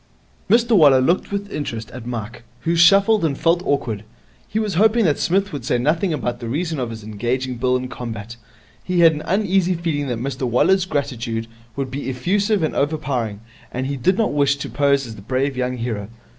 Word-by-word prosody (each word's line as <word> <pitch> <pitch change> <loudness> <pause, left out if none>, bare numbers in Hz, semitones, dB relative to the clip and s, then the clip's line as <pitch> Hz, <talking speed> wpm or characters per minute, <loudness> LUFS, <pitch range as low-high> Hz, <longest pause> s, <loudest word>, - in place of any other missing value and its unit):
Mr 230 0 +4
Waller 145 -7 +7
looked 170 +11 +1
with 200 0 -3
interest 115 -6 -5
at 115 - -9
Mike, 115 -1 -5 0.2
who 165 +1 0
shuffled 195 +5 +5
and 145 -4 0
felt 170 +1 +2
awkward. 115 -7 -1 0.4
He - - -4
was 215 -3 0
hoping 220 +4 +4
that 150 -4 +2
Psmith 195 +2 +1
would 140 -4 -5
say 125 0 +1
nothing 160 +9 +1
about 120 -5 -2
the 115 - -5
reason 160 +3 -2
of 125 -2 -2
his 110 -2 -8
engaging 120 +4 -2
Bill 125 +1 +1
in 130 0 -5
combat. 115 -3 -7 0.5
He 180 -1 +1
had 165 -1 +7
an 150 - -5
uneasy 190 -2 +1
feeling 160 -4 -2
that 120 -3 -2
Mr 130 +1 -3
Waller's 175 +10 +3
gratitude 125 -7 -2 0.3
would 135 -2 -3
be 140 0 -4
effusive 195 - 0
and 155 - -1
overpowering, 135 -8 -1 0.3
and 130 +1 -3
he 140 +1 -2
did 180 +9 +1
not 220 -7 +1
wish 140 -1 +3
to 140 - -6
pose 140 -1 +2
as 110 -2 -9
the - - -10
brave 130 +5 -1
young 125 0 -2
hero. 110 -4 -4
140 Hz, 200 wpm, -21 LUFS, 120-175 Hz, 0.5 s, Waller